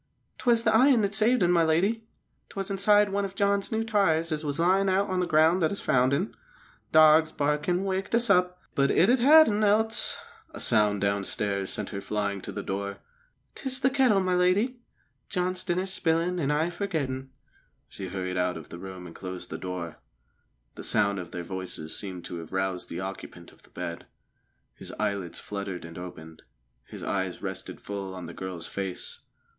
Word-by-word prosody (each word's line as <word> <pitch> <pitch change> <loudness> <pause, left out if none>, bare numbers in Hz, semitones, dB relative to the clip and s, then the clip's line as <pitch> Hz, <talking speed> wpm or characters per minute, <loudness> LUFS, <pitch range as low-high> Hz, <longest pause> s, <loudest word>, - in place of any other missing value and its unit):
"'Twas 235 -2 +3
th' - - -2
iron 240 +2 +5
that 200 -1 0
saved 220 +2 +4
un, 175 - +3
my 170 -1 +4
lady. 195 +8 +1 0.4
'Twas 195 0 -4
inside 205 +1 +4
one 200 +1 -1
of 195 -1 -5
John's 200 0 +1
new 220 0 0
tyres 175 -7 +1
as 155 0 -2
was 145 0 -2
lyin' 190 +3 +3
on 190 0 +1
the 180 - 0
ground 160 +2 +4
that 160 - +2
us 200 - -4
found 130 0 +2
un. 175 +9 -1 0.6
Dogs 155 0 +6
barkin' 150 +5 0
wakened 190 +2 -1
us 235 0 +3
up. 180 -2 +3
But 140 0 +2
it'd 240 +9 +4
ha' - - -1
had 310 +3 +8
un, 210 0 +1
else 220 +2 +3 0.2
" 445 -7 -27
A - - -7
sound 105 -3 +2
downstairs 100 0 -1
sent - - -3
her 100 - -5
flying 100 -1 -2
to - - -6
the 100 - -5
door. 100 +1 -4 0.6
"'Tis 260 -2 -3
the 265 0 +3
kettle, 260 -7 +4
my 185 -1 0
lady. 195 +8 +2 0.5
John's 185 0 -1
dinner 185 0 -1
spilin', 175 -1 0
an' 145 -4 0
I 155 +4 +1
forgettin'." 140 -8 -3 0.6
She 95 - -7
hurried 90 0 -4
out 90 -1 0
of 80 - -11
the 85 - -9
room 95 -1 -8
and 85 - -11
closed 90 -1 -7
the - - -5
door. 90 -3 -6 0.7
The - - -9
sound 100 -1 +2
of 90 -2 -7
their 85 0 -6
voices 90 -3 -4
seemed 95 -3 -5
to 85 - -6
have 80 - -10
roused 95 -1 -2
the 85 +2 -5
occupant 95 +1 -8
of - - -23
the - - -22
bed. 85 0 -6 0.7
His - - -10
eyelids 100 -4 -3
fluttered 100 -4 -5
and 85 0 -10
opened; 80 -3 -10 0.4
his - - -9
eyes 95 -1 -2
rested 95 -1 -5
full 100 -2 -6
on 90 -2 -7
the 85 - -8
girl's 90 -3 -6
face. 95 -2 -5
155 Hz, 190 wpm, -27 LUFS, -, 0.7 s, had